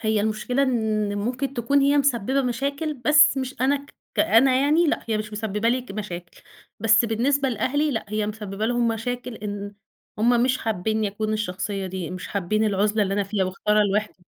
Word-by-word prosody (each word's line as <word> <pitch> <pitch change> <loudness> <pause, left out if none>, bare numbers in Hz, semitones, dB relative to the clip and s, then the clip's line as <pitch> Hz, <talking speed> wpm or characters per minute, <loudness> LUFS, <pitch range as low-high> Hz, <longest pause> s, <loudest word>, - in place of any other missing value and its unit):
هي 220 -1 +1
المشكلة 220 +5 0
إن 215 -5 0
ممكن 255 +5 -2
تكون 280 +3 +2
هي 280 +1 +3
مسبّبة 270 -1 +1
مشاكل 280 +5 -2
بس 295 +4 +5
مش 260 0 -4
أنا 270 +3 +3
ك 280 +1 -11 0.2
كأنا 265 -3 +4
يعني 305 +5 +3
لأ، 305 - -1
هي 220 -1 +1
مش 215 0 -6
مسبّب 210 0 -2
لي 250 +2 +2
ك 245 - -10
مشاكل. 180 -4 -7 0.4
بس 220 +1 +4
بالنسبة 265 +5 +1
لأهلي 285 +6 0
لأ، 225 -5 -2
هي 215 0 -1
مسبّبة 210 -1 -4
لهم 240 0 +1
مشاكل 245 +2 -3
إن 205 -1 -6 0.4
هم 235 +2 +3
مش 255 +1 +1
حابّينّي 220 0 -1
أكون 215 +2 -3
الشخصية 195 -1 -3
دي، 185 -2 -5
مش 185 0 -7
حابّين 205 +3 0
العُزلة 210 +1 +1
اللي 195 -1 -1
أنا 205 - +1
فيها 200 -1 -1
مختارة 210 +3 +1
الوِحدة 205 -2 -2
220 Hz, 185 wpm, -24 LUFS, 205-255 Hz, 0.4 s, بس